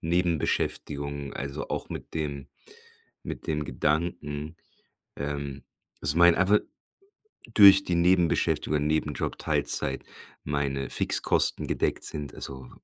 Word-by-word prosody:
Nebenbeschäftigungen, 75 -4 -1
also, 70 +1 -5
auch - - -4
mit - - -8
dem 70 -3 -4 0.8
mit - - -7
dem 75 -1 -1
Gedanken, 75 +2 -2 0.6
ähm, 70 -2 -5 0.4
dass 75 - +3
mein 85 0 +7
einfach 95 +3 +4 1.0
durch 100 -2 +9
die 90 - -1
Nebenbeschäftigungen, 85 -4 +2
Nebenjob, 75 -1 -1
Teilzeit 65 0 0 0.4
meine 70 -2 -2
Fixkosten - - +3
gedeckt - - -1
sind, 75 -4 -5
also 65 -2 -7
75 Hz, 105 wpm, -27 LUFS, 70-85 Hz, 1.0 s, durch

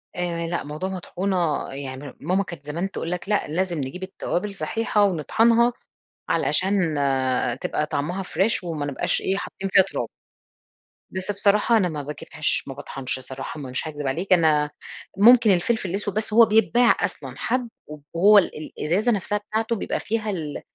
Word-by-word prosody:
آآ، 170 -1 -2
لأ 170 +1 -2
موضوع 150 +6 -4
مطحونة 180 -3 -1
يعني 135 0 -7
ماما 185 +6 +1
كانت 170 -6 -10
زمان 170 +6 -3
تقول 165 - -4
لك 180 +2 -4
لأ 210 - +1
لازم 175 +2 -1
نجيب 145 +6 -5
التوابل 190 +1 -3
صحيحة 210 +5 0
ونطحنها، 225 +7 +3 0.6
علشان، 185 -4 +1 0.7
تبقى 150 - -1
طعمها 160 +6 -2
fresh 195 +3 0
وما 160 -4 -3
نبقاش 140 - 0
إيه 195 +1 0
حاطين 195 -1 -5
فيها 190 - +7
تراب. 195 - -4 1.0
بس 190 +2 -3
بصراحة، 210 +3 +3
أنا 185 -5 +2
ما 150 -3 -4
باجيبهاش 150 +1 -2
ما 135 - -5
باطحنش 135 -1 -4
صراحة 130 +3 -7
مش 130 +2 -4
هاكذِب 145 -2 -5
عليك، 175 +8 +1
أنا 155 -4 +3 0.5
ممكن 230 +1 +7
الفلفل 190 +2 +1
الأسود 200 +2 -2
بس 215 0 -2
هو 230 +1 +8
بيتباع 230 +2 +4
أصلًا - - -3
حَبّ 250 -2 -1 0.2
و 150 - -8 0.2
وهو 200 +5 +6
ال 155 -5 +1
الإزازة 195 +10 +1
نفسها 210 0 0
بتاعته 220 +2 -2
بيبقى 205 - -2
فيها 220 0 -2
ال 160 -7 -4
185 Hz, 160 wpm, -24 LUFS, 150-205 Hz, 1.0 s, هو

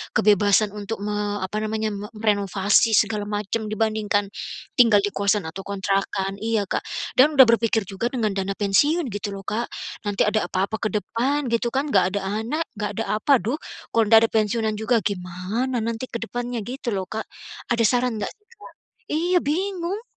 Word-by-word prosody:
kebebasan 205 0 +4
untuk 210 0 -5
me 205 -1 -2
apa 210 +3 -2
namanya, 215 0 -1
me 205 +1 -6
merenovasi 205 +1 +2
segala 210 -2 +1
macam, 210 +1 -2
dibandingkan 215 -1 0 0.5
tinggal 210 -4 +6
di 205 - -2
kosan 200 0 +1
atau 160 +4 -6
kontrakan. 195 0 -1
Iya, 220 -2 0
Kak. - - -2 0.4
Dan 295 +4 +6
sudah 265 - +10
berpikir 230 -1 +2
juga 195 +5 -3
dengan 225 -5 -1
dana 195 0 -2
pensiun, 290 - +2
gitu 205 +1 -4
loh, 195 - -8
Kak. 230 +3 -2 0.4
Nanti 205 0 +1
ada 210 -2 +1
apa-apa 195 +4 -1
ke 215 - +1
depan, 265 +7 -1
gitu 235 +1 +1
kan, 275 +3 0
nggak 190 0 +3
ada - - -2 0.2
anak, 305 +8 -1
enggak 210 -1 -2
ada, - - 0 0.2
apa, 280 - +5
duh, 235 +10 -1 0.3
kalau 225 -1 +3
nggak 225 +1 +8
ada - - -3
pensiunan 220 0 +1
juga 225 0 +2
gimana 200 +6 -2
nanti 230 +2 -3
ke 235 - -6
depannya, 245 0 -4
gitu 245 +1 -4
loh, 190 - -1
Kak. 220 0 -4 0.4
Ada 235 -1 +1
saran 245 +1 +2
nggak - - -2
sih, 420 - -21 0.5
Kak? - - -78
Iya, 350 +4 +1
bingung. 365 +5 -2
215 Hz, 180 wpm, -23 LUFS, 205-235 Hz, 0.5 s, sudah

